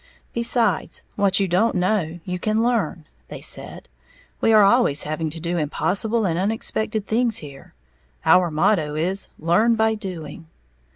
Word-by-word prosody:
"Besides, 235 -5 0
what 200 -2 +3
you 195 - +1
don't 190 +6 +1
know 180 -3 -1
you 180 -1 -4
can 215 +3 0
learn," 205 -10 -1 0.2
they - - -8
said, - - -2 0.5
"we 225 - +3
are 215 -2 +6
always 200 - +3
having 155 +1 -3
to 165 +2 -7
do 170 +2 -3
impossible 205 +9 0
and 170 -2 -1
unexpected 220 +1 -1
things 230 +1 +1
here, 140 -3 -9 0.5
our 180 -1 +5
motto 155 -1 +1
is 185 +5 -1
'Learn 215 +9 +2
by 220 0 +2
doing.'" 170 -7 -7
190 Hz, 150 wpm, -22 LUFS, 165-220 Hz, 0.5 s, are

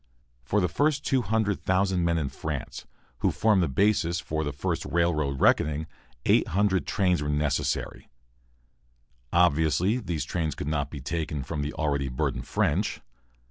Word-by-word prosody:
For 100 +12 0
the 90 - +2
first 145 - 0
200,000 100 -6 +1
men 85 -1 +2
in 75 -4 -1
France, 65 - -6 0.3
who - - +2
formed 105 -4 +3
the 85 - +2
basis 85 +2 +2
for 80 -2 -3
the 75 - -2
first 70 - -2
railroad 75 -5 0
reckoning, 75 +1 +3 0.4
800 95 +1 +2
trains 90 -5 +1
were 75 - -2
necessary. 75 0 -1 1.2
Obviously, 85 - +3
these 85 - -3
trains 80 -2 -2
could - - -5
not 70 -2 -1
be 70 -2 -7
taken 75 +1 -3
from 75 +3 -4
the 75 +1 -3
already 70 -3 -1
burdened 65 -1 -2
French. - - 0
80 Hz, 140 wpm, -27 LUFS, 75-95 Hz, 1.2 s, formed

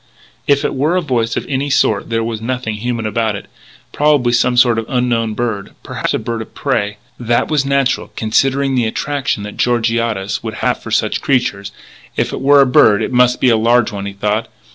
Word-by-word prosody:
If 140 +1 +2
it - - -1
were 150 +6 0
a 185 - +2
voice 120 -7 -1
of - - -3
any 140 +1 -1
sort 135 - +1
there 115 0 0
was 115 -1 -4
nothing 125 -1 -3
human 115 0 -3
about 110 -1 -1
it.... 100 - -8 0.5
Probably 145 -5 +2
some 125 +1 +2
sort 120 -2 +4
of 115 - -6
unknown 120 -4 0
bird.... 110 -5 -3
Perhaps - - -2
a - - +1
bird 115 0 -4
of 110 - -11
prey.... 105 -7 -1 0.2
That 120 -1 0
was 145 -3 +1
natural, 140 -2 0
considering 135 +5 +1
the 125 -3 +1
attraction 140 -2 -2
that 105 0 -8
Georgiades 115 -4 0
would - - -5
have - - -1
for - - -8
such - - 0
creatures.... 100 -7 0 0.5
If - - -1
it - - -4
were 140 +1 +6
a - - +5
bird 110 -5 +4
it - - -3
must 125 0 +3
be 130 - +3
a 115 - +4
large 120 +1 +2
one, 100 -1 -5
he 100 - -6
thought.... 105 +3 -1
120 Hz, 210 wpm, -16 LUFS, 110-135 Hz, 0.5 s, were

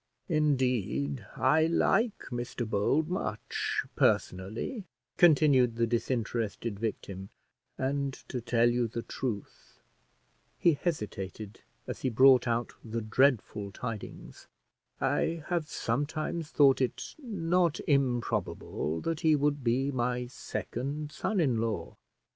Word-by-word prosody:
"Indeed, 125 - 0
I 160 0 +4
like 205 +6 +2
Mr 120 -1 -3
Bold 110 +9 +1
much, 175 - -2
personally," 110 - 0 0.3
continued 140 -8 +5
the 115 0 +2
disinterested 115 -2 -2
victim; 100 -3 -4 0.5
"and 140 +1 -1 0.2
to 125 - -4
tell 120 0 +3
you 120 0 +1
the 115 +1 -5
'truth,'" 110 -7 -6 0.8
he 170 - +4
hesitated 110 - -4 0.2
as - - -6
he 130 - +1
brought 130 +2 +6
out 120 0 -1
the 115 0 -3
dreadful 110 -3 +1
tidings, 115 0 -7 0.5
"I 165 -1 0
have 170 -4 -1
sometimes 150 +5 -2
thought 135 -2 +5
it 130 - -2
not 180 - +1
improbable 120 - 0
that 165 -2 -2
he 160 -2 +4
would 145 -1 0
be 130 +4 +1
my 125 -1 -1
second 140 +4 -5
son 210 +4 -1
in 130 -9 +2
law." 115 -1 -3
125 Hz, 115 wpm, -30 LUFS, 115-150 Hz, 0.8 s, brought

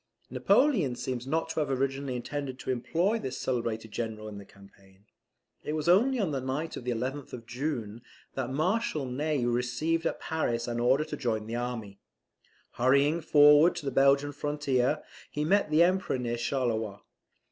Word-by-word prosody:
Napoleon 205 - +3
seems 125 0 -4
not 160 +3 -1
to - - -2
have 150 -2 0
originally 135 0 -1
intended 130 +1 -4
to 130 - -3
employ 175 - 0
this 130 - -5
celebrated 115 -3 -2
General 110 -1 -4
in 105 -1 -8
the 100 - -11
campaign. 100 0 -20 0.6
It 150 - -3
was 155 +1 -2
only 235 +10 +4
on 190 -7 0
the 135 -2 -2
night 135 +5 -3
of 125 - -8
the - - -2
11th 130 +4 -3
of 115 -2 -7
June, 120 -3 -4 0.3
that 130 -2 -3
Marshal 155 - 0
Ney 140 +1 -1
received 125 +8 0
at - - -3
Paris 120 -7 -2
an 120 0 -2
order 130 +5 +3
to 150 - -5
join 115 -6 -2
the 115 +2 -5
army. 115 -5 -4 0.8
Hurrying 140 +6 +3
forward 150 +2 +6
to - - -6
the 135 - -1
Belgian 140 +2 +3
frontier, 145 -1 0 0.3
he 150 0 -2
met 200 +1 +2
the 155 +2 +5
Emperor 185 -5 +1
near 120 -1 -2
Charleroi. 115 -5 -2
135 Hz, 170 wpm, -29 LUFS, 120-150 Hz, 0.8 s, forward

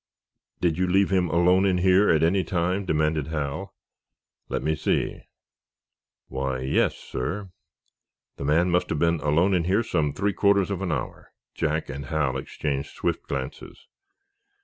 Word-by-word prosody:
"Did 85 -2 +1
you 95 - +2
leave 95 +2 +3
him 90 -3 +2
alone 90 +3 +4
in 95 -2 +2
here, 95 +3 +4
at 80 -1 +3
any 90 +3 +3
time?" 90 +3 -1
demanded 75 -3 0
Hal. 75 -3 -4 0.7
"Let - - -2
me 80 +2 +1
see. 80 - -1 1.1
Why, 65 0 -3
yes, 65 - +1
sir. 90 +9 -5 0.9
The 70 - -5
man 85 +5 +3
must 90 +1 +1
have - - -1
been 85 -1 +2
alone 80 +7 +2
in 85 -3 +1
here 100 +6 +2
some 80 -9 0
three 100 +6 -1
quarters 100 -1 +2
of 95 -1 -3
an 95 -3 -1
hour." 65 -5 -5 0.2
Jack 80 0 -1
and 70 +1 -6
Hal 70 -4 0
exchanged 70 +1 -3
swift - - -2
glances. 65 -1 -6
85 Hz, 155 wpm, -25 LUFS, 75-95 Hz, 1.1 s, alone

